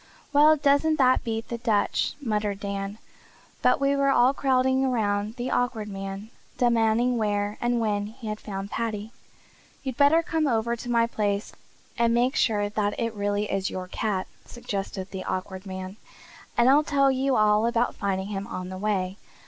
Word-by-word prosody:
"Well, 300 Hz, +2 st, +7 dB
doesn't 285 Hz, +2 st, +3 dB
that 255 Hz, -3 st, +3 dB
beat 225 Hz, -1 st, -3 dB
the 235 Hz, -, -4 dB
Dutch!" 220 Hz, -3 st, +1 dB
muttered 210 Hz, -6 st, -2 dB
Dan. 200 Hz, 0 st, -4 dB, 0.6 s
But -, -, +3 dB
we 275 Hz, 0 st, +2 dB
were 275 Hz, 0 st, +2 dB
all 255 Hz, 0 st, +4 dB
crowding 260 Hz, -1 st, +2 dB
about 215 Hz, -4 st, 0 dB
the 250 Hz, +1 st, -3 dB
Awkward 230 Hz, -4 st, -1 dB
Man, 195 Hz, +2 st, -6 dB, 0.3 s
demanding 235 Hz, 0 st, +2 dB
where 205 Hz, -1 st, -1 dB
and 240 Hz, 0 st, +1 dB
when 205 Hz, -2 st, 0 dB
he 220 Hz, +1 st, -10 dB
had 215 Hz, 0 st, -3 dB
found 195 Hz, -1 st, -6 dB
Paddy. 220 Hz, -2 st, -3 dB, 0.7 s
"You'd 260 Hz, -3 st, -4 dB
better 305 Hz, +4 st, +5 dB
come 320 Hz, -2 st, 0 dB
over 235 Hz, -1 st, +1 dB
to 240 Hz, +1 st, -8 dB
my 235 Hz, -1 st, +3 dB
place 205 Hz, -3 st, -2 dB, 0.5 s
and 235 Hz, 0 st, +3 dB
make 250 Hz, +4 st, +2 dB
sure 210 Hz, -7 st, +2 dB
that 205 Hz, 0 st, -2 dB
it 230 Hz, -2 st, -1 dB
really 205 Hz, 0 st, -1 dB
is 195 Hz, -1 st, -1 dB
your 185 Hz, -1 st, -5 dB
cat," 190 Hz, 0 st, -2 dB, 0.2 s
suggested 195 Hz, -4 st, -5 dB
the 190 Hz, -1 st, -5 dB
Awkward 185 Hz, +1 st, -4 dB
Man, 190 Hz, +1 st, -6 dB, 0.6 s
"and 240 Hz, -, +5 dB
I'll 280 Hz, +3 st, +6 dB
tell 275 Hz, -2 st, +3 dB
you 265 Hz, 0 st, +1 dB
all 215 Hz, +1 st, +4 dB
about 235 Hz, +1 st, +1 dB
finding 195 Hz, -1 st, -2 dB
him 195 Hz, -1 st, -4 dB
on 185 Hz, 0 st, -5 dB
the 185 Hz, 0 st, -6 dB
way. 195 Hz, -2 st, -1 dB
220 Hz, 175 wpm, -26 LUFS, 205-250 Hz, 0.7 s, Well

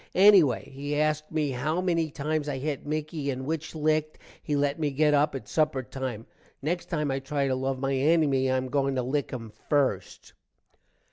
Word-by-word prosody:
ennyway 190 Hz, -8 st, +6 dB
he 145 Hz, +2 st, -3 dB
asked 155 Hz, 0 st, 0 dB
me 155 Hz, -3 st, 0 dB
how 150 Hz, +7 st, -1 dB
many 170 Hz, -3 st, +1 dB
times 150 Hz, +1 st, -2 dB
i 135 Hz, -, -2 dB
hit 145 Hz, +1 st, -4 dB
Micky 155 Hz, -1 st, -3 dB
and 130 Hz, -1 st, -3 dB
which 160 Hz, +2 st, -3 dB
licked. 155 Hz, 0 st, 0 dB, 0.2 s
he 150 Hz, -, -2 dB
let 145 Hz, +1 st, 0 dB
me 150 Hz, -2 st, +1 dB
get 150 Hz, +2 st, +2 dB
up 145 Hz, 0 st, +3 dB
at 135 Hz, -, -6 dB
supper 150 Hz, -4 st, +1 dB
time. 130 Hz, -3 st, -5 dB, 0.3 s
next 175 Hz, +5 st, -2 dB
time 150 Hz, -4 st, -1 dB
i 135 Hz, -, -1 dB
try 140 Hz, +1 st, -1 dB
to 130 Hz, -, +1 dB
love 130 Hz, +1 st, -1 dB
my 135 Hz, +1 st, -1 dB
ennymy 140 Hz, -2 st, +3 dB
i 130 Hz, -, +2 dB
am 130 Hz, -, -1 dB
a -, -, -7 dB
going 140 Hz, -1 st, +1 dB
to 130 Hz, -, 0 dB
lick 140 Hz, +3 st, -1 dB
him 115 Hz, -4 st, -7 dB, 0.2 s
first. 130 Hz, -11 st, 0 dB
145 Hz, 200 wpm, -27 LUFS, 135-155 Hz, 0.3 s, ennyway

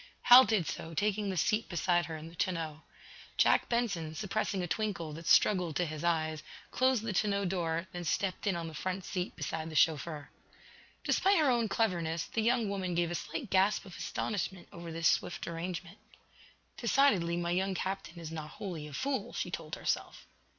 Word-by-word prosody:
Hal 250 Hz, +2 st, +10 dB
did 210 Hz, -7 st, +1 dB
so, 165 Hz, +2 st, -5 dB
taking 205 Hz, +2 st, 0 dB
the 190 Hz, -, -2 dB
seat 215 Hz, +7 st, +1 dB
beside 175 Hz, 0 st, +1 dB
her 160 Hz, -1 st, -5 dB
in 155 Hz, +1 st, -9 dB
the 165 Hz, -, -12 dB
tonneau. 165 Hz, -4 st, -2 dB, 0.6 s
Jack -, -, +4 dB
Benson, 200 Hz, -10 st, -1 dB
suppressing 205 Hz, 0 st, -1 dB
a -, -, -2 dB
twinkle 175 Hz, -6 st, -2 dB
that 165 Hz, +2 st, -8 dB
struggled 180 Hz, -6 st, +4 dB
to 180 Hz, -, +1 dB
his 155 Hz, -1 st, -5 dB
eyes, 160 Hz, -2 st, 0 dB, 0.3 s
closed 255 Hz, -3 st, +2 dB
the 225 Hz, -3 st, -2 dB
tonneau 200 Hz, 0 st, +1 dB
door, 170 Hz, -2 st, -1 dB
then 175 Hz, 0 st, -5 dB
stepped 190 Hz, +5 st, -1 dB
in 195 Hz, -, +2 dB
on 170 Hz, -1 st, -3 dB
the 160 Hz, -, -8 dB
front 185 Hz, +3 st, -3 dB
seat 180 Hz, 0 st, -3 dB
beside 160 Hz, 0 st, -4 dB
the 155 Hz, -, -8 dB
chauffeur. 155 Hz, -1 st, +1 dB, 0.7 s
Despite 390 Hz, 0 st, +3 dB
her 300 Hz, -5 st, +4 dB
own 235 Hz, -3 st, +1 dB
cleverness, 170 Hz, -6 st, 0 dB
the 225 Hz, -, -2 dB
young 235 Hz, 0 st, +2 dB
woman 190 Hz, -3 st, -2 dB
gave 170 Hz, 0 st, +1 dB
a -, -, -1 dB
slight 180 Hz, +6 st, -5 dB
gasp 195 Hz, +2 st, +3 dB
of 185 Hz, -3 st, -10 dB
astonishment 190 Hz, -3 st, -3 dB
over 170 Hz, -1 st, -7 dB
this 165 Hz, 0 st, +1 dB
swift 175 Hz, -, 0 dB
arrangement. 170 Hz, +1 st, -5 dB, 0.8 s
"Decidedly, 220 Hz, -9 st, +3 dB
my 175 Hz, 0 st, -1 dB
young 190 Hz, +2 st, 0 dB
captain 190 Hz, -1 st, -4 dB
is 165 Hz, -2 st, -7 dB
not 155 Hz, -2 st, -6 dB
wholly, 170 Hz, -7 st, -5 dB
a 150 Hz, -, -11 dB
fool," 265 Hz, -, -2 dB
she 180 Hz, -, -3 dB
told 160 Hz, -3 st, -5 dB
herself. -, -, -3 dB
180 Hz, 185 wpm, -32 LUFS, 165-205 Hz, 0.8 s, Hal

